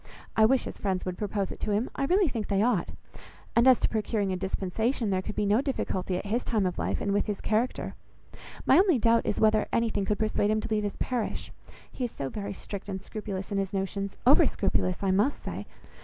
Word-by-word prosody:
I 220 - +6
wish 260 +3 +3
his - - -7
friends 190 -2 -1
would 185 -1 -3
propose 205 -2 -2
it - - -8
to - - -3
him. 215 +5 +1
I 275 - -1
really 370 +4 +3
think 225 -6 -3
they 200 0 +2
ought. 230 -7 +1 0.7
And, 235 +2 +5
as 260 -2 +7
to - - +3
procuring 210 -3 -1
a - - 0
dispensation, 200 +5 -1
there 185 -1 +1
could 210 +2 -6
be 210 - 0
no 210 +5 +3
difficulty 190 -9 -2
at 185 - -5
his 230 +5 0
time 215 -5 0
of 180 - -2
life, - - -1
and 200 - 0
with 205 - +1
his 205 -2 -2
character. 225 +4 -1 0.7
My - - +6
only 370 -7 +4
doubt 230 0 +3
is, - - 0
whether 215 -1 +3
anything 225 -4 +1
could 210 +1 0
persuade 215 -1 +1
him 215 0 +2
to - - -6
leave 215 -1 +1
his 205 -1 -3
parish. 245 -4 -2 0.4
He 255 - -3
is 240 - -5
so 135 - -4
very 200 +3 -5
strict 200 +1 -7
and 190 -1 -3
scrupulous 205 -2 -5
in 200 - 0
his 195 0 -2
notions; 195 0 -3
over 270 +4 +7
scrupulous 185 -1 0
I 195 - +2
must 210 +9 +1
say. - - -5
210 Hz, 230 wpm, -28 LUFS, 195-230 Hz, 0.7 s, as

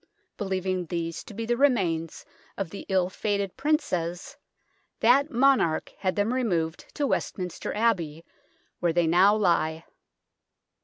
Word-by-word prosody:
Believing 185 -3 -2
these 165 0 -3
to - - -11
be 230 +2 -3
the 240 +1 +1
remains 190 - +1 0.3
of 195 -5 -3
the 200 - -8
ill 185 -2 +2
fated 200 0 -2
Princes, 230 - -1 0.6
that 270 +6 +4
monarch 250 -10 +2
had 185 -2 0
them 210 +4 +1
removed 175 -11 -1
to 290 - 0
West - - -1
minster 180 -2 -4
Abbey, 170 -8 0 0.5
where 170 -2 +1
they 175 0 +3
now 185 +5 +5
lie. 165 -5 +1
190 Hz, 135 wpm, -26 LUFS, 170-230 Hz, 0.6 s, now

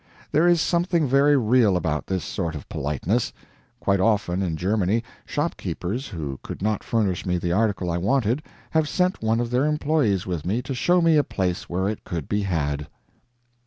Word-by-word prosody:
There 160 +4 +4
is 175 -1 +5
something 170 -2 +1
very 140 +2 +4
real 115 -5 +4
about 80 -4 -2
this 95 -3 -1
sort 80 -2 -3
of 70 - -8
politeness. 80 - -1 0.5
Quite 100 -1 +1
often, 100 -3 +1
in 85 -4 -1
Germany, 100 +4 +1 0.2
shopkeepers 120 - -3
who 75 -8 -5
could - - -7
not 105 0 0
furnish 105 -6 0
me 90 -1 0
the 85 0 -2
article 95 -2 +1
I 85 - -1
wanted 120 - +1 0.3
have 160 -2 +2
sent 180 0 0
one 110 +1 +1
of 120 0 -2
their 125 +3 +2
employees 150 - +1
with 85 -5 -3
me 110 +7 -1
to 135 - -4
show 175 +8 +3
me 165 -2 +5
a 145 - +4
place 90 -7 -2
where 95 +2 0
it 105 0 -3
could 85 -5 -4
be 105 0 0
had. 75 -6 -1
105 Hz, 185 wpm, -24 LUFS, 90-135 Hz, 0.5 s, is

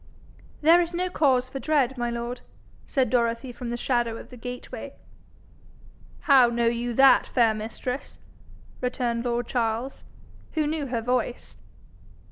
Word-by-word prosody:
'There 330 +3 +6
is 340 0 -3
no 365 +1 -1
cause 260 -6 +2
for 270 +1 -6
dread, 270 -4 +1
my 240 -1 -2
lord,' 235 +1 -4 0.5
said 265 -3 +1
Dorothy 235 +1 0
from 240 0 -7
the 240 - -3
shadow 240 -2 0
of - - -11
the 250 - -11
gateway. 245 +1 -7 1.3
'How 265 -4 +6
know 235 0 0
you 235 0 -1
that, 270 +1 +6
fair 230 -3 +3
mistress?' 230 +5 -5 0.6
returned 245 -2 -1
lord 240 0 -1
Charles, 235 +2 -2 0.5
who 310 -2 +1
knew 300 -1 -2
her 240 -2 -2
voice. 245 0 -2
245 Hz, 140 wpm, -25 LUFS, 235-270 Hz, 1.3 s, There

